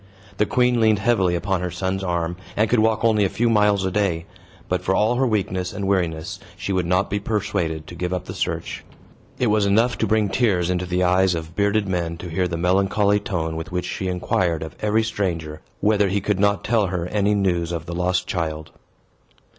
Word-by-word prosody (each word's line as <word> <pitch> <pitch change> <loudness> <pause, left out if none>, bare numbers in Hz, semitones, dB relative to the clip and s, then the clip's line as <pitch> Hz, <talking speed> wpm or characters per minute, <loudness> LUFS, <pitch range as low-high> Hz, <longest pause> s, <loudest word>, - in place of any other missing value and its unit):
The 105 - +2
queen 125 -1 +2
leaned 110 -2 +4
heavily 100 -4 +2
upon 95 +1 -1
her 90 - -2
son's 95 +2 -2
arm, 85 -1 -1 0.2
and 110 +2 +3
could 120 +1 +2
walk 110 0 +2
only 110 -2 +4
a 95 - +2
few 115 +3 +1
miles 105 -3 +3
a 95 - -1
day. 90 -4 0 0.4
But - - -1
for 95 - 0
all 110 +3 +3
her 130 0 +2
weakness 95 -4 -1
and 100 -2 -3
weariness, 85 -5 -1 0.2
she 100 - -3
would 90 -2 0
not 90 +1 +2
be 100 - 0
persuaded 100 -7 -2
to - - -10
give 90 +1 -3
up 90 -1 -2
the - - -6
search. - - -3 0.5
It 125 - +1
was 105 -1 +2
enough 115 +5 +2
to - - +1
bring 110 -2 +2
tears 95 -6 +1
into 90 0 -1
the 90 +1 0
eyes 90 0 +3
of 80 0 -6
bearded 100 0 +1
men 85 -3 -2
to 90 +1 -7
hear 90 +3 0
the 85 -1 -3
melancholy 100 +3 +2
tone 80 -6 -3
with 80 +3 -6
which 90 0 -2
she 95 - -3
inquired 90 -2 0
of 80 -2 -8
every 110 +1 +2
stranger 85 -8 -3 0.2
whether 105 -1 +3
he 100 +2 +1
could 100 0 -1
not 100 0 +2
tell 110 -3 +2
her 90 -2 -2
any 105 +1 +1
news 90 -4 0
of 85 -1 -4
the 85 - -6
lost 90 +1 0
child. 80 -3 -3
95 Hz, 215 wpm, -22 LUFS, 85-105 Hz, 0.5 s, leaned